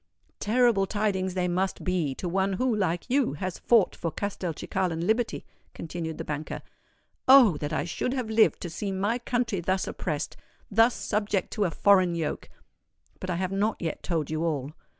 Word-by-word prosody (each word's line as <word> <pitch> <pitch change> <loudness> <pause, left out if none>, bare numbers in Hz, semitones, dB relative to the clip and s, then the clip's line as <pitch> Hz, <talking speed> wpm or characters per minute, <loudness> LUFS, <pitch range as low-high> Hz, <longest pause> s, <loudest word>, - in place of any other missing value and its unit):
"Terrible 225 -3 +3
tidings 190 -3 -1
they 180 -1 +1
must 185 +2 -1
be 175 -7 0
to 180 - -4
one 190 +2 +1
who, 245 +4 +1
like 175 -4 -1
you, 260 - +2
has 185 +4 -4
fought 230 -5 +3
for 165 - -3
Castelcicalan 175 -2 -2
liberty," 225 +3 0 0.3
continued 165 -1 -5
the - - -4
banker. 150 +1 -5 0.6
"Oh! 255 - +8
that 145 +1 -4
I 155 - 0
should 250 +8 -2
have 255 -4 -2
lived 220 0 +3
to 175 - -4
see 195 +4 -3
my 200 +5 0
country 240 -5 -1
thus 185 +2 0
oppressed—thus 210 +8 -1
subject 205 -3 -1
to 210 - 0
a - - +1
foreign 185 -1 +4
yoke! 160 -3 -3 0.7
But 185 - -6
I 180 - 0
have 185 +1 -2
not 205 +3 0
yet 165 -3 -3
told 160 -4 -2
you 155 +1 -1
all. 145 -4 -1
190 Hz, 170 wpm, -27 LUFS, 170-215 Hz, 0.7 s, Oh